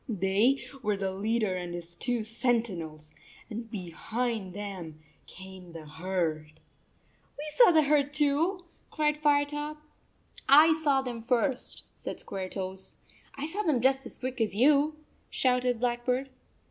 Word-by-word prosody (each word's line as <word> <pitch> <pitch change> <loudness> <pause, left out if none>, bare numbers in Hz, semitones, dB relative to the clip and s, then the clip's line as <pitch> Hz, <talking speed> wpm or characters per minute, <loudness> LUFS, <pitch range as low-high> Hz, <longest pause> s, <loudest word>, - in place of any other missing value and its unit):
They 205 +6 +2 0.2
were 210 -2 0
the 195 -1 -2
leader 210 0 0
and 175 -1 -4
his 170 0 -8
two 240 +3 -2
sentinels, 210 -10 -2 0.4
and 225 +1 -6
behind 215 +2 -3
them 185 -7 -6 0.3
came 190 -2 -11
the 160 -2 -9
herd." 160 -1 -2 0.8
"We 295 - -4
saw 475 +7 +7
the 320 -3 +5
herd, 285 -1 +2
too," 310 +6 +1 0.2
cried 300 -1 +1
Firetop. 295 0 +1 0.7
"I 310 +3 +8
saw 290 -4 +2
them 240 -3 -5
first," 250 +3 0
said - - -6
Squaretoes. 190 0 -5 0.4
"I 280 - -4
saw 370 +7 -2
them 310 -10 +2
just 265 +2 +2
as - - -10
quick 255 -1 -4
as 215 -3 0
you," 290 +5 +4 0.3
shouted 250 -2 +1
Blackbird. 250 +2 -1
235 Hz, 135 wpm, -29 LUFS, 190-285 Hz, 0.8 s, I